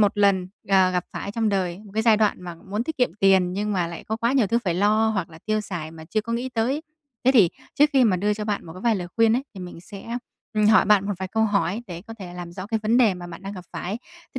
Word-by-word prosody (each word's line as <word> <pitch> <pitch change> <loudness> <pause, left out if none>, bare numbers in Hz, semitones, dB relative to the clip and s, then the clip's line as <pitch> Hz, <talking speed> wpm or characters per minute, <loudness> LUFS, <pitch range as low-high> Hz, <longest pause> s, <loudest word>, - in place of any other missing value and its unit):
1 205 -1 +4
lần, 195 -3 +3 0.2
ờ, 190 -2 +5
gặp 180 -1 -1
phải 200 - -5
trong 225 0 0
đời, 185 -3 -1
một 205 - -13
cái 220 - +1
giai 220 -1 +5
đoạn 210 -3 +1
mà 175 -1 -6
muốn 200 +6 -4
tiết 315 +2 -4
kiệm 250 -8 +1
tiền 190 -3 +4
nhưng 210 +2 -1
mà 180 -3 +1
lại 170 0 -8
có 220 - -2
quá 235 +2 +1
nhiều 260 -6 +3
thứ 230 +5 +2
phải 175 - +1
lo 210 +4 +3
hoặc 195 -6 -2
là 160 - -12
tiêu 215 0 +1
xài 175 -6 -5
mà 160 -1 -11
chưa 215 +7 -1
có 230 +2 -5
nghĩ 240 +2 -2
tới. 245 +6 +1 0.4
Thế 260 - +5
thì 205 -10 +6 0.2
trước 295 +1 +4
khi 265 -2 +5
mà 200 -5 +3
đưa 205 +3 +1
cho 210 0 -4
bạn 210 -4 -2
một 160 - -8
cái 185 - -10
vài 230 -2 +3
lời 180 -2 -5
khuyên 225 -1 +5
ấy, 260 - -1
thì 190 - -8
mình 180 -2 -8
sẽ 205 +6 -6 0.3
,ừm, 215 -1 +2
hỏi 215 +1 +6
bạn 200 -1 +4
một 205 - 0
vài 190 0 -4
câu 220 +3 +1
hỏi 205 +1 0
để 175 -3 -7
có 225 - -8
thể 180 -3 -8
làm 175 -1 -7
rõ 185 +2 -7
cái 220 0 -1
vấn 220 +2 +2
đề 230 -6 +5
mà 180 -1 -8
bạn 175 +2 -10
đang 195 - -5
gặp 185 -3 -9
phải. 200 +5 -4 0.4
Thế - - -3
205 Hz, 300 wpm, -24 LUFS, 180-220 Hz, 0.4 s, thì